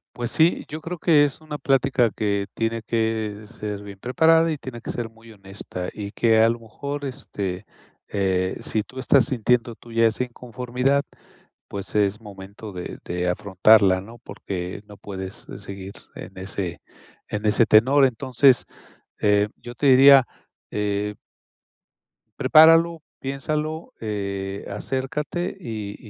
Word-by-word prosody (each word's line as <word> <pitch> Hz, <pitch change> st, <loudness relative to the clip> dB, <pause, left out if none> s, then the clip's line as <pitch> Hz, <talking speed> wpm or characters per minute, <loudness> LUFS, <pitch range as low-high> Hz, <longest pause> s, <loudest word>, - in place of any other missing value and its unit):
Pues 120 Hz, -1 st, -3 dB
sí, 165 Hz, +2 st, +2 dB
yo 155 Hz, +2 st, -7 dB
creo 175 Hz, +3 st, -5 dB
que 155 Hz, -3 st, +5 dB
es 145 Hz, -2 st, -1 dB
una 155 Hz, -1 st, -7 dB
plática 135 Hz, -4 st, +2 dB
que 100 Hz, -2 st, -1 dB
tiene 115 Hz, 0 st, -2 dB
que 110 Hz, -2 st, -2 dB
ser 105 Hz, -1 st, -6 dB
bien 100 Hz, -1 st, -10 dB
preparada, 160 Hz, +8 st, +3 dB
y 155 Hz, -, -2 dB
tiene 130 Hz, -4 st, -8 dB
que -, -, -5 dB
ser 120 Hz, -2 st, -4 dB
muy 115 Hz, 0 st, -17 dB
honesta, 95 Hz, -3 st, -7 dB
y 100 Hz, -2 st, -6 dB
que 115 Hz, 0 st, +3 dB
a 115 Hz, -, +5 dB
lo 115 Hz, +1 st, -2 dB
mejor, 140 Hz, +6 st, -6 dB
este, 100 Hz, -8 st, -5 dB, 0.4 s
eh, 95 Hz, -2 st, 0 dB
si 110 Hz, -, -2 dB
tú 130 Hz, +4 st, -11 dB
estás 135 Hz, 0 st, +4 dB
sintiendo 125 Hz, -2 st, +1 dB
tú 115 Hz, +1 st, -14 dB
ya 115 Hz, 0 st, +4 dB
esa 115 Hz, +3 st, -1 dB
inconformidad, 125 Hz, +3 st, -1 dB, 0.7 s
pues, 100 Hz, 0 st, -7 dB
es 105 Hz, 0 st, +2 dB
momento 100 Hz, 0 st, -10 dB
de 90 Hz, -1 st, -7 dB
de 90 Hz, 0 st, -1 dB
afrontarla, 95 Hz, 0 st, +4 dB
¿no? 115 Hz, +5 st, -12 dB
Porque 95 Hz, -4 st, -6 dB
no 105 Hz, -1 st, -13 dB
puedes, 95 Hz, -1 st, -8 dB
eh, -, -, -7 dB
seguir 100 Hz, -1 st, -8 dB, 0.2 s
en -, -, -10 dB
ese 95 Hz, -2 st, -5 dB, 0.5 s
en 105 Hz, 0 st, -4 dB
ese 105 Hz, +2 st, +4 dB
tenor, 130 Hz, +7 st, +5 dB
entonces, 130 Hz, +1 st, +3 dB, 0.6 s
eh, 105 Hz, 0 st, +3 dB
yo 120 Hz, 0 st, -9 dB
te 140 Hz, -, -1 dB
diría, 135 Hz, 0 st, +8 dB, 0.4 s
eh 105 Hz, 0 st, -2 dB, 1.3 s
Prepáralo, 165 Hz, +1 st, +6 dB, 0.2 s
piénsalo, 155 Hz, -, -3 dB
eh, 100 Hz, -2 st, -4 dB
acércate, 135 Hz, -, -3 dB
y 110 Hz, -, -6 dB
115 Hz, 145 wpm, -23 LUFS, 100-135 Hz, 1.3 s, diría